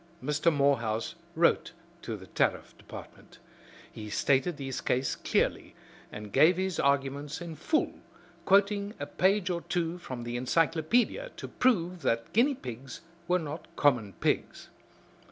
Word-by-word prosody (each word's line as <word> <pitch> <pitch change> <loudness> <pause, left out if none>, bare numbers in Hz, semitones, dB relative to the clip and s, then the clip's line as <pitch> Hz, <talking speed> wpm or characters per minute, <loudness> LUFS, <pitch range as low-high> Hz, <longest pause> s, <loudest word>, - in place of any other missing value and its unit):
Mr. 150 +4 +2
Morehouse 120 -7 +1 0.2
wrote - - +2 0.3
to - - -5
the - - -12
Tariff - - -1
Department. - - -12 0.5
He 105 -1 -8
stated 140 - +1
his 135 -2 -4
case 130 +1 0
clearly, - - -1 0.4
and 105 -1 -8
gave 160 +6 +6
his 190 -2 -1
arguments 140 +1 0
in 170 -2 -7
full, 310 - 0 0.4
quoting 200 +1 +3
a 145 - -3
page 190 +4 +1
or 170 -1 -2
two 170 0 -2
from 130 -7 -6
the 120 +1 -3
encyclopedia 165 - +1
to - - -6
prove 180 -8 +1
that 115 -4 -1
guinea 265 +6 +4
pigs 125 - -8 0.3
were 180 - +3
not 155 -1 -6
common 120 -9 +2
pigs. - - -2
150 Hz, 135 wpm, -29 LUFS, 130-180 Hz, 0.5 s, gave